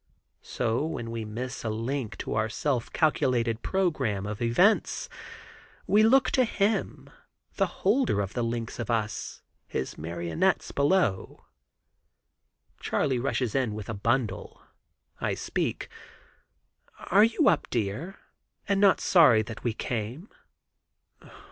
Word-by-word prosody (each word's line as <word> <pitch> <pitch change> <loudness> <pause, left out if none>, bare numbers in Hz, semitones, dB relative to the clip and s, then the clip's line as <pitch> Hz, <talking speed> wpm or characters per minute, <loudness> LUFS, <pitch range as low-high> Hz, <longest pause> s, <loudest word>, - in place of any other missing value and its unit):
So 120 +3 -1
when 120 -8 -4
we 115 -1 -4
miss 125 +5 -5
a 110 - -2
link 115 +2 -3
in - - -3
our 110 0 0
self 130 0 -2
calculated 125 -7 +1
program 140 - -1
of 105 +1 -5
events, 175 - +2 0.8
we 210 - +4
look 255 +5 +4
to 260 - +3
Him, 215 -2 -1 0.5
the 195 - +2 0.2
holder 220 - +2
of 100 0 -2
the 120 - -2
links 115 0 -4
of 120 - -4
us—his 110 - -4
marionettes 85 +1 -1
below. 140 - 0 1.3
Charley 130 -4 0
rushes 125 -3 -1
in 125 -6 0
with 110 0 -7
a - - -2
bundle. 115 0 -2 0.6
I - - -1
speak: - - -3 1.2
"Are 200 +3 +7
you 230 +7 +3
up, - - +3
dear, 120 - -3 0.5
and 200 -1 +1
not 200 -2 +5
sorry 130 - +5
that 115 0 -9
we 120 - 0
came?" 120 - -4
120 Hz, 125 wpm, -27 LUFS, 110-175 Hz, 1.3 s, Are